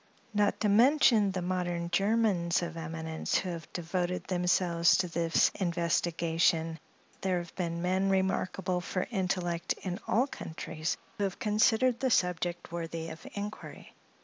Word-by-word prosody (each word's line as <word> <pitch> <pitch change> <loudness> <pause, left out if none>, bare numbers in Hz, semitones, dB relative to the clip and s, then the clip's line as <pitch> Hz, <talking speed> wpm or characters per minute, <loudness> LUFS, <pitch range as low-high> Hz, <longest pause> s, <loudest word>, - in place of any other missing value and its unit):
Not 205 -1 +2
to 215 - +3
mention 225 -2 +5
the 185 -1 -3
modern 175 -1 -2
Germans 195 -3 +2
of 170 -1 -5
eminence, 160 0 -2
who 185 - -2
have 165 -2 -7
devoted 180 +1 -2
themselves 175 -1 +2
to 185 - 0
this 165 -1 +2
investigation, 170 -2 +1 0.4
there 185 -1 +1
have 175 -1 -6
been 170 -2 -2
men 190 +2 +1
remarkable 190 -1 0
for 185 +1 -2
intellect 180 -4 -1
in 185 -1 -3
all 245 +4 +3
countries, 160 - -4 0.2
who - - +1
have 190 - -3
considered 225 +3 +2
the 265 - +1
subject 180 -5 0
worthy 165 -1 -4
of 160 - -10
inquiry. 205 +1 -7
180 Hz, 140 wpm, -30 LUFS, 170-195 Hz, 0.4 s, mention